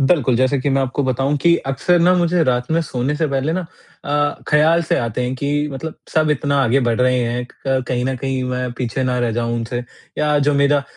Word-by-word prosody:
बिल्कुल, 135 -4 +2
जैसे 130 +2 +2
कि 140 - 0
मैं 135 0 +2
आपको 135 +2 -2
बताऊँ 135 +3 0
कि 170 0 +5 0.2
अक्सर 175 +6 +2
ना 180 +2 +5
मुझे 175 -1 +2
रात 125 0 0
में 165 - +3
सोने 135 -1 -2
से 160 - 0
पहले 140 +2 -1
ना 185 - -1 0.4
अ, 145 0 0
ख़्याल 160 +3 +4
से - - +2
आते 115 +1 -2
हैं 125 - -2
कि 140 +2 -3 0.2
मतलब 160 +4 -6 0.2
सब 155 -1 +3
इतना 140 0 0
आगे 130 +3 +2
बढ़ 115 +1 0
रहे 125 0 +3
हैं, 120 +1 -3
क - - -21 0.2
क - - -3
कहीं 125 -1 -1
न 130 0 -1
कहीं 130 0 -2
मैं 125 -1 -3
पीछे 125 +1 -2
ना 125 -1 0
रह 120 -1 0
जाऊँ 115 +1 -1
उनसे 120 +1 -3 0.4
या 150 -1 +2
जो 145 0 +2
मेरा 140 0 +3
135 Hz, 235 wpm, -19 LUFS, 125-150 Hz, 0.4 s, कि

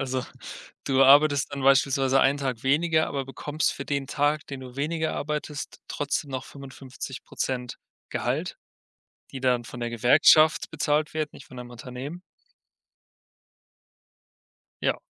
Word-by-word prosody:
Also, 130 -1 -2 0.6
du 135 0 +3
arbeitest 145 +1 +5
dann 140 -1 -4
beispielsweise 135 0 +4
einen 140 +2 +3
Tag 130 -5 -3
weniger, 155 +4 +2
aber 140 -2 -3
bekommst 145 +3 -2
für 140 - -7
den 140 -2 -2
Tag, 145 +2 0
den 135 -1 -7
du 125 -1 -11
weniger 160 +3 -1
arbeitest, 150 0 -4
trotzdem 145 0 -2
noch 130 -1 -4
55% 135 -2 -6 0.3
Gehalt, - - -2 0.8
die 135 - -6
dann 125 -2 +1
von 120 +2 -9
der 120 - -2
Gewerkschaft 125 +6 +5
bezahlt 150 -1 0
werden, 155 -1 -2
nicht 140 - -13
von 130 - -13
deinem 125 0 -8
Unternehmen. 130 +8 -8 2.6
Ja. - - +1
140 Hz, 130 wpm, -26 LUFS, 130-150 Hz, 2.6 s, arbeitest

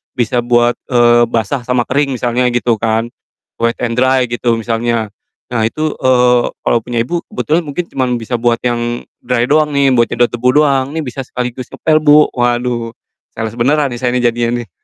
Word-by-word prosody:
bisa 120 0 0
buat, 120 0 +2 0.2
eee, 120 -1 +5
basah 115 +2 -2
sama 125 -1 +1
kering 140 0 0
misalnya,” 120 +1 0
gitu 120 -1 +1
kan. 115 +1 -1 0.5
Wet 115 0 +1
and 120 +1 -1
dry 130 0 +3
gitu 120 0 0
misalnya. 115 -1 -1 0.4
Nah 115 -2 0
itu, 155 +5 -3
eee, 125 -1 +3 0.2
"Kalau 120 - +2
punya 120 -1 -3
Ibu 170 +7 -4
kebetulan 170 -5 0
mungkin 160 +5 -3
cuman 125 -2 -1
bisa 120 +2 -3
buat 120 0 +1
yang 120 0 -2 0.2
dry 125 -1 0
doang 150 0 +3
nih, 140 -1 +3
buat 120 -1 +3
nyedot 120 0 +1
debu 120 +1 0
doang. 135 -2 +1
Nih 160 - -2
bisa 135 +1 -5
sekaligus 125 0 -5
ngepel, 155 -1 +2
Bu." 150 0 +6
Waduh, 120 -1 -1 0.4
sales 110 0 -4
beneran 145 +5 +2
nih 120 - -5
saya 125 -1 0
nih 125 - 0
jadinya 120 +1 -1
nih. - - -20
120 Hz, 185 wpm, -15 LUFS, 120-130 Hz, 0.5 s, Bu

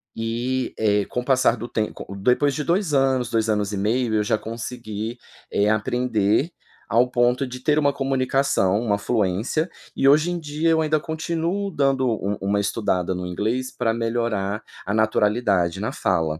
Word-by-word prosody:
E, 120 +3 -2
eh, 105 -2 +2
com 125 - -3
o - - -11
passar 130 -3 +3
do 120 +2 -6
tem 110 -2 -2
co - - -9
depois 125 +7 +2
de 150 - -2
2 175 -1 0
anos, 130 -3 +2
2 110 -1 +1
anos 105 -1 0
e - - -2
meio 110 +3 0
eu 105 - +2
já 105 - +1
consegui, 115 0 -6 0.3
eh, 105 +1 +2
aprender 110 - +1 0.4
ao 120 +4 +3
ponto 125 +2 +2
de 125 0 -7
ter 150 +2 +2
uma 145 -1 +3
comunicação, 135 -7 +1
uma 105 -3 0
fluência. 110 - 0 0.3
E 135 - +2
hoje 150 +5 +5
em 175 - -2
dia 155 +1 -1
eu 160 -1 +3
ainda 155 0 +2
continuo 170 +5 -2
dando 135 -3 +1
u 105 -3 -1
uma 100 +1 +1
estudada 95 -4 0
no 90 - -4
inglês 110 +9 -2
pra 120 -2 +1
melhorar 115 -3 -1 0.2
a 100 - -2
naturalidade 105 -4 +2
na - - -2
fala. 80 -1 0
120 Hz, 175 wpm, -23 LUFS, 105-135 Hz, 0.4 s, hoje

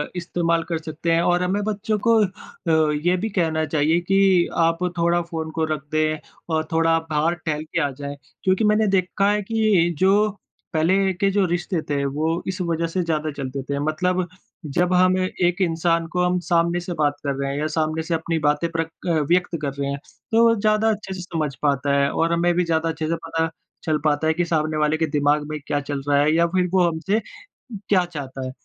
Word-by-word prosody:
इस्तेमाल 170 -1 0
कर 165 - 0
सकते 160 +1 -3
हैं 165 0 +3
और 175 +1 +2
हमें 195 +3 0
बच्चों 215 +1 -1
को 230 - +6
अ, 160 -4 -1
ये 180 +1 +4
भी 215 +5 -2
कहना 160 -5 0
चाहिए 155 +2 +2
कि 190 -1 +3
आप 165 0 +3 0.2
थोड़ा 170 +1 +2
फ़ोन 160 -1 -5
को 160 0 -1
रख 150 - -5
दें 155 0 +1 0.4
और 155 0 +1
थोड़ा 165 0 +3
बाहर 155 +2 +1
टहल 155 -1 -1
के 160 +2 -2
आ 145 - +1
जाएँ। 140 0 -5 0.3
क्योंकि 190 +3 +2
मैंने 210 0 +3
देखा 195 +1 +1
है 210 0 +1
कि 210 -5 +2
जो 200 +4 +4 0.4
पहले 190 +5 +2
के 195 +2 +1
जो 200 -1 +2
रिश्ते 175 -1 -1
थे 140 -1 0
वो 155 +4 -1
इस 190 - -2
वज़ह 170 -1 -1
से 180 +3 -1
ज़्यादा 155 -2 -1
चलते 135 -1 -5
थे। 140 +1 -3
मतलब 180 +5 0 0.5
जब 180 +1 +2
हम 185 +1 +4
एक 185 0 0
इंसान 165 -1 +1
को 180 0 +1
हम 180 0 +1
सामने 170 0 +2
से 175 0 -5
बात 145 -1 +2
कर 140 -1 -1
रहे 140 0 -1
हैं 140 - -3
या 155 - 0
सामने 155 0 0
से 165 - -3
अपनी 165 0 -1
बातें 150 +3 +1
प्रक 165 0 -2 0.2
अ, 175 - +2 0.2
व्यक़्त 175 -1 +2
कर 140 -2 -2
रहे 140 0 -1
हैं 140 - -3 0.3
तो 230 0 +5
ज़्यादा 215 +1 +2
अच्छे 210 -3 -3
से 185 - -6
समझ 160 -5 -3
पाता 140 -1 +1
है 140 0 +2
और 165 +1 +1
हमें 175 +1 +2
भी 180 +1 +2
ज़्यादा 165 0 0
अच्छे 160 -1 -3
से 165 - 0
पता 165 0 0 0.3
चल 155 -1 +1
पाता 150 0 +1
है 160 - +3
कि 175 +2 0
सामने 155 -2 0
वाले 150 +1 +2
के 160 - +1
दिमाग 145 0 +2
में 155 0 -4
क्या 145 - 0
चल 140 -1 -3
रहा 145 -1 +3
है 150 +2 +3
या 170 - +4
फिर 180 +1 +1
वो 185 - +4
हमसे 170 +6 0 0.7
क्या 185 -3 +4
चाहता 135 -6 -6
है। 130 - -4
165 Hz, 215 wpm, -22 LUFS, 155-180 Hz, 0.7 s, को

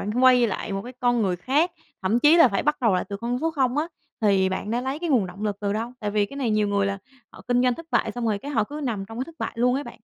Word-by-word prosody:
bạn 210 +5 -2
quay 250 -2 +6
lại 205 -1 -4
một 195 0 -3
cái 245 - -9
con 245 -2 +2
người 185 -3 0
khác, 285 - +1 0.3
thậm 200 +5 +2
chí 300 +5 +6
là 330 -6 +7
phải 195 - -1
bắt 295 0 +1
đầu 225 -6 +3
lại 180 - 0
từ 200 - -4
con 235 +4 -2
số 325 - 0
0 265 -4 0
á, 310 - +1 0.3
thì 195 -3 +3
bạn 190 +2 -3
đã 235 +2 0
lấy 265 +3 -3
cái 340 0 -3
nguồn 235 -9 +3
động 185 +3 -9
lực 205 -1 -1
từ 200 -1 -1
đâu? 225 +3 -3
Tại 210 -2 -2
vì 205 0 +1
cái 275 - -11
này 260 -5 -1
nhiều 215 -1 +2
người 200 -1 +1
là 200 0 -2 0.3
họ - - -14
kinh 245 0 +3
doanh 250 -1 +3
thất 330 +3 -10
bại, 220 - +1
xong 240 +1 -3
rồi 210 -2 0
cái 280 +8 -7
họ 225 -7 +1
cứ 295 +7 -7
nằm 220 -6 -2
trong 225 +3 -9
cái 255 - -1
thất 330 - -13
bại - - -3
luôn 250 +2 +2
ấy 280 +2 -2
bạn. - - -9
235 Hz, 330 wpm, -24 LUFS, 205-260 Hz, 0.3 s, là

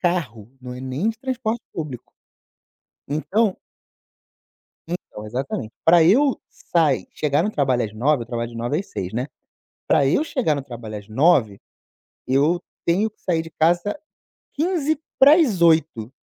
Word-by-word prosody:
carro, 145 - -2
não 125 0 -8
é 125 - -8
nem 130 +10 -2
de 225 0 -3
transporte 240 -3 -3
público. 150 -7 -7 1.0
Então 190 +8 0 1.3
Então, 165 -11 -7
exatamente, 125 -1 -4
pra 170 +1 +6
eu 260 - +4
sai, 160 -6 0
chegar 150 +1 +1
no 210 - 0
trabalho 130 - +1
às 105 - -6
9h, 135 +4 +1
eu - - -9
trabalho 115 -1 -4
de 115 - -10
9h 120 +8 -1
às - - -9
18h, 90 +1 -5
né. 125 +3 -2 0.6
Pra 140 - +4
eu 275 - +2
chegar 245 - 0
no 140 - -4
trabalho 115 -5 -8
às 100 -1 -11
9h, 120 - +3 0.7
eu 150 +7 +2 0.2
tenho 195 +6 +2
que 215 - -40
sair 170 -3 0
de 165 - -10
casa 175 - +1 0.6
7:45 275 - +2
155 Hz, 145 wpm, -22 LUFS, 125-200 Hz, 1.3 s, pra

